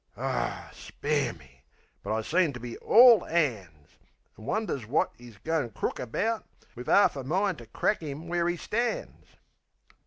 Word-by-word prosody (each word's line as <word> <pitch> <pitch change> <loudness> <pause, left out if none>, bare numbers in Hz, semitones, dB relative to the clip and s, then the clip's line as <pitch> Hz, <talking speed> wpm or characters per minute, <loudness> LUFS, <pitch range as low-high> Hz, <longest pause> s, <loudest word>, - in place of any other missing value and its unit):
(Aw, - - -3
spare 145 -4 -2
me! 70 -6 -19 0.4
But - - -3
I 110 - 0
seemed 165 0 +1
to - - -6
be 120 -1 -7
ALL 235 -3 +7
'ands!) 100 - -2 0.4
An' 110 - -13
wonders 175 - -2
wot 135 - +1
'e's 120 -4 -13
goin' 160 +1 -1
crook 105 - -3
about, 215 - -1 0.3
Wiv 125 +1 -7
'arf 200 - +5
a 135 - -5
mind 185 +6 0
to 120 - -12
crack 210 - 0
'im 155 +2 -6
where 175 0 0
'e 175 - -2
stands. 240 - -3
145 Hz, 160 wpm, -28 LUFS, 115-180 Hz, 0.4 s, ALL